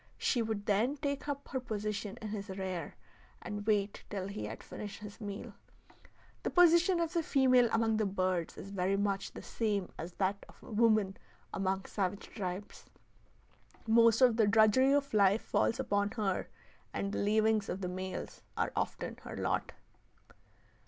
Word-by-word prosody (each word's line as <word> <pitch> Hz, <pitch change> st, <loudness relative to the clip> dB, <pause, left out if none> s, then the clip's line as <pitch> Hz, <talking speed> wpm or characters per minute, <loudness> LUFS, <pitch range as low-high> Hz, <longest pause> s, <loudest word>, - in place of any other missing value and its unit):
She 245 Hz, -, +1 dB
would 220 Hz, -2 st, -2 dB
then 230 Hz, +8 st, +2 dB
take 280 Hz, 0 st, -3 dB
up 285 Hz, -1 st, -4 dB
her 260 Hz, -, -1 dB
position 210 Hz, -3 st, -4 dB
in 215 Hz, -, -4 dB
his 205 Hz, -1 st, -5 dB
rear 190 Hz, -2 st, -4 dB, 0.4 s
and 205 Hz, 0 st, -6 dB
wait 205 Hz, -2 st, +1 dB
till 195 Hz, -2 st, -3 dB
he 105 Hz, -, -5 dB
had 110 Hz, +2 st, -7 dB
finished 205 Hz, -1 st, -7 dB
his 210 Hz, +1 st, -10 dB
meal. 205 Hz, -1 st, -6 dB, 0.9 s
The -, -, -1 dB
position 350 Hz, +1 st, +5 dB
of 335 Hz, -1 st, -1 dB
the 340 Hz, -, +2 dB
female 255 Hz, -5 st, +4 dB
among 225 Hz, -1 st, +2 dB
the 215 Hz, -2 st, +1 dB
birds 185 Hz, -3 st, -1 dB
is 195 Hz, -, -8 dB
very 195 Hz, 0 st, +1 dB
much 195 Hz, -1 st, -1 dB
the -, -, -9 dB
same 205 Hz, -5 st, -1 dB
as 170 Hz, +3 st, -6 dB
that 195 Hz, +1 st, -1 dB
of -, -, -17 dB
woman 215 Hz, -3 st, +2 dB, 0.4 s
among 190 Hz, 0 st, -1 dB
savage 195 Hz, -1 st, -3 dB
tribes. 190 Hz, -1 st, -5 dB, 1.0 s
Most 230 Hz, +1 st, +5 dB
of 245 Hz, -3 st, +6 dB
the 220 Hz, -3 st, +4 dB
drudgery 220 Hz, +5 st, +5 dB
of 280 Hz, -2 st, +1 dB
life 200 Hz, 0 st, +4 dB
falls 230 Hz, -, +1 dB
upon 205 Hz, 0 st, +1 dB
her, 195 Hz, -4 st, 0 dB, 0.4 s
and 200 Hz, -, -2 dB
the -, -, -2 dB
leavings 215 Hz, 0 st, +2 dB
of 190 Hz, -, -3 dB
the 180 Hz, -, -2 dB
males 185 Hz, +1 st, -5 dB, 0.2 s
are -, -, 0 dB
often -, -, -3 dB
her -, -, -8 dB
lot. -, -, -1 dB
210 Hz, 165 wpm, -33 LUFS, 195-230 Hz, 1.0 s, of